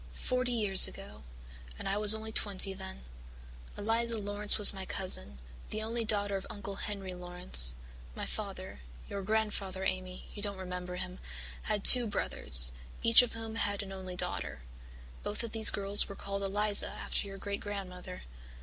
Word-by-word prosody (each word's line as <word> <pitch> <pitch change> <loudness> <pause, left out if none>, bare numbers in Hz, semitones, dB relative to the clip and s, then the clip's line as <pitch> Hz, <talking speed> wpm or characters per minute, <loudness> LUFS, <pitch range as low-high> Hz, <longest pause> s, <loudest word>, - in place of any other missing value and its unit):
Forty 255 - -5
years 205 -5 +8
ago 70 +1 -13 0.6
and - - -10
I 195 - -4
was 210 0 +2
only 220 0 -10
twenty 200 -2 0
then. 65 - -13 0.7
Eliza 230 +2 -4
Laurance 205 0 -2
was 210 -1 +10
my 190 -1 -9
cousin, 70 - 0 0.3
the 215 0 -6
only 230 +1 -6
daughter 205 -2 -2
of 190 - -8
Uncle 200 -1 -10
Henry 195 -3 -8
Laurance. 180 - +2 0.4
My - - -8
father 65 - -8 0.3
your 200 - -8
grandfather, 200 -2 -5
Amy, 185 -1 -7
you 205 - -12
don't 200 -1 -5
remember 180 -1 -9
him 185 0 -9 0.4
had 210 -2 -6
two 245 -2 +9
brothers, 65 - +6 0.3
each 230 +2 +5
of 245 - -6
whom 225 0 -10
had 205 -2 -4
an 195 - -12
only 185 -1 -10
daughter. 180 - -6 0.6
Both 205 - -7
these 220 -1 +2
girls 200 +1 +1
were 200 - -10
called 200 0 -8
Eliza 205 +1 -3
after - - -7
your 195 0 -12
great 200 +1 -7
grandmother. 185 -3 -10
200 Hz, 160 wpm, -28 LUFS, 185-215 Hz, 0.7 s, was